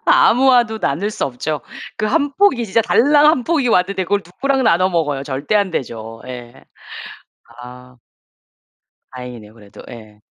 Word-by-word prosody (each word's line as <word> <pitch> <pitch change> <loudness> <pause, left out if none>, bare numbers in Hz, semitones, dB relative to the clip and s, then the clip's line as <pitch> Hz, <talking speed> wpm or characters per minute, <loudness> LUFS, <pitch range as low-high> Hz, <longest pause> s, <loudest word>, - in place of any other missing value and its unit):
아무와도 250 - +4
나눌 200 +3 -2
수 - - -3
없죠. 145 +4 -4 0.4
그 215 - -1
1 285 +6 0
포기 275 -9 +2
진짜 220 +3 +2
달랑 290 +6 +4
1 300 -5 +3
포기 295 -6 0
왔는데 190 -1 +1
그걸 200 +3 0
누구랑 270 +10 -1
나눠 185 -1 +3
먹어요. 150 -6 -1
절대 140 +7 -3
안 200 -2 +2
되죠. 115 -6 -6
예. 125 0 -10 1.0
아. 125 +1 -13 1.2
다행이네요 125 -4 -10
그래도 105 -3 -15
예. 110 -3 -13
180 Hz, 275 characters per minute, -18 LUFS, -, 1.2 s, 아무와도